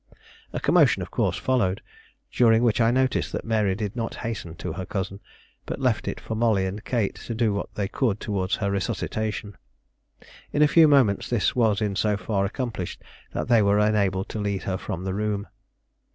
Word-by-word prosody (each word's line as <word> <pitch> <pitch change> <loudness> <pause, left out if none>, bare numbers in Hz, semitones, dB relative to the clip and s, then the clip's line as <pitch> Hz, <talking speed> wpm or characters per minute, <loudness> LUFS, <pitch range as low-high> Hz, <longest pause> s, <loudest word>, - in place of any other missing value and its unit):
A - - -3
commotion, - - +4
of - - -10
course, - - 0
followed, 110 -8 +1 0.5
during 115 -1 +4
which 120 0 +3
I 115 - +4
noticed 130 +1 +1
that - - -3
Mary 105 -4 +1
did 105 0 -4
not 115 -2 -3
hasten 100 -8 -4
to 80 - -5
her 95 +3 -5
cousin, 95 +1 -4 0.5
but - - -4
left - - 0
it - - -3
for - - -5
Molly 110 -4 +2
and 100 +3 -5
Kate 115 -6 0
to 115 - -6
do 110 -2 +1
what 100 - -4
they 100 -3 -1
could 110 -2 0
toward 100 -2 -2
her 100 -2 0
resuscitation. 105 +2 -3 1.0
In 150 - +3
a - - +6
few 160 +2 +6
moments 130 -9 +3
this 120 -4 +1
was 110 -4 +2
in 105 -2 0
so 105 0 +1
far 100 -2 -1
accomplished 110 -4 -4 0.3
that - - -2
they 120 -2 +5
were 100 0 +3
enabled 100 -3 +2
to 110 - -4
lead 100 -2 -2
her 95 -1 -2
from 90 0 -5
the 95 0 -2
room. 105 0 -1
105 Hz, 195 wpm, -25 LUFS, 100-115 Hz, 1.0 s, a